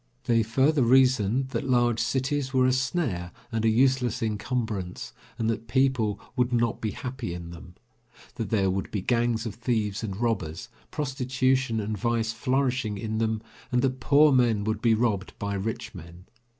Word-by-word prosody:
They 115 -1 +3
further 135 +7 +2
reasoned 130 -1 +3
that 135 - -3
large 120 -2 +3
cities 135 +3 -1
were 130 -1 +4
a 130 - +4
snare 125 - -1 0.2
and 115 -1 -1
a 115 - +4
useless 125 0 +2
encumbrance, 110 -4 -3 0.2
and 110 - -1
that 115 0 -2
people 130 -5 +1 0.2
would 125 -1 +1
not 120 -2 0
be 110 - -1
happy 125 -6 -5
in 85 -1 -8
them, 85 +1 -12 0.6
that 115 -4 -4
there 95 -4 +2
would 95 +1 -3
be 100 -3 -3
gangs 120 -1 +1
of 110 - -4
thieves 110 -3 -1
and 100 -4 -4
robbers, 105 -3 -2 0.2
prostitution 130 -3 0
and 105 -1 -3
vice 115 +1 0
flourishing 125 -2 0
in 110 +2 -3
them, 110 -1 -1 0.3
and 125 0 +2
that 130 -1 0
poor 150 +1 +5
men 120 -5 +3
would 110 0 -2
be 115 -2 +4
robbed 105 -4 -1
by 100 -1 -3
rich 105 +4 -4
men. 85 0 -11
115 Hz, 170 wpm, -26 LUFS, 105-130 Hz, 0.6 s, poor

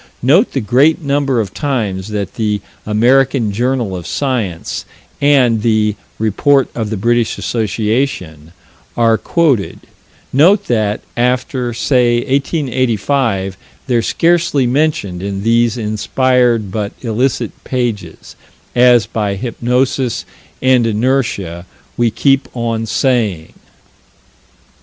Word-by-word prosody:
Note 165 - +4
the 135 - 0
great 140 - +3
number 140 -3 +1
of 100 -4 -3
times 110 -10 -2
that 105 -2 -4
the 105 -2 -1 0.3
American 120 +1 +2
Journal 120 -2 -1
of 90 -2 -7
Science 115 - -2 0.4
and 130 -6 +3
the 110 -2 +1 0.2
Report 130 +6 +2
of 110 -3 -3
the 110 - -3
British 120 +3 +1
Association 105 - -2 0.5
are 115 -1 +4
quoted: 140 - 0 0.5
note 185 +9 +4
that, 110 -3 0
after, 125 0 0
say, 120 0 +2
1885, 130 - 0 0.3
they're 120 -3 +1
scarcely 165 -1 +1
mentioned 125 - 0
in 100 0 -4
these 115 +1 +2
inspired 115 0 +1
but 105 0 -3
illicit 125 +3 -1
pages 120 -5 -4 0.4
as 120 -3 +5
by 105 -3 -2
hypnosis 125 +3 -1 0.4
and 130 -3 +4
inertia, 110 -7 -1 0.3
we 120 -1 +2
keep 135 +4 +1
on 115 -1 -2
saying. 110 - 0
120 Hz, 105 wpm, -15 LUFS, 105-130 Hz, 0.5 s, as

